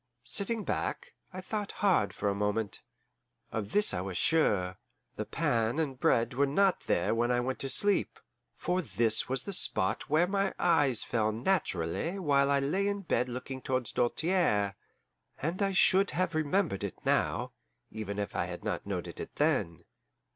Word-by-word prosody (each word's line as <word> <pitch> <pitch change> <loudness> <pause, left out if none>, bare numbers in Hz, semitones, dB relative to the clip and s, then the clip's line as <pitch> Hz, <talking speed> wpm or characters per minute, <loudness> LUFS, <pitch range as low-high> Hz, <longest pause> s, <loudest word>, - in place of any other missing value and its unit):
Sitting 205 - -1
back, - - -3 0.2
I 185 0 -7
thought 205 +2 -4
hard 185 - +2
for 105 - -3
a 100 - +2
moment. 105 +1 -1 0.7
Of 105 -3 -4
this 210 0 +4
I 90 - -1
was 95 -1 -4
sure: 95 - +1 0.4
the - - -4
pan 120 -6 0
and 140 -5 -2
bread 115 -2 +2
were 140 +3 +2
not 190 +6 +2
there 85 - +1
when 120 +1 +1
I 120 0 +2
went 130 +2 -2
to 135 - -2
sleep, 205 +9 +1 0.4
for 180 +1 0
this 115 -8 +2
was 130 0 -1
the 200 - -3
spot - - +1
where 160 +3 +4
my 195 +1 -1
eyes 145 -9 +4
fell 110 -2 0
naturally 120 - -1
while 140 -6 +2
I 140 0 +3
lay 185 +9 0
in 200 0 -2
bed 125 -8 0
looking 130 +2 -6
towards 130 -4 -2
Doltaire; 120 - +1 0.6
and 170 +7 -3
I 195 -1 +2
should 190 +1 +4
have 180 -2 0
remembered 155 - 0
it 100 - -4
now, - - 0 0.4
even 100 -2 -5
if 100 -1 -4
I - - 0
had - - -7
not - - -3
noted - - -4
it - - -7
then. 85 -1 0
135 Hz, 170 wpm, -30 LUFS, 110-185 Hz, 0.7 s, this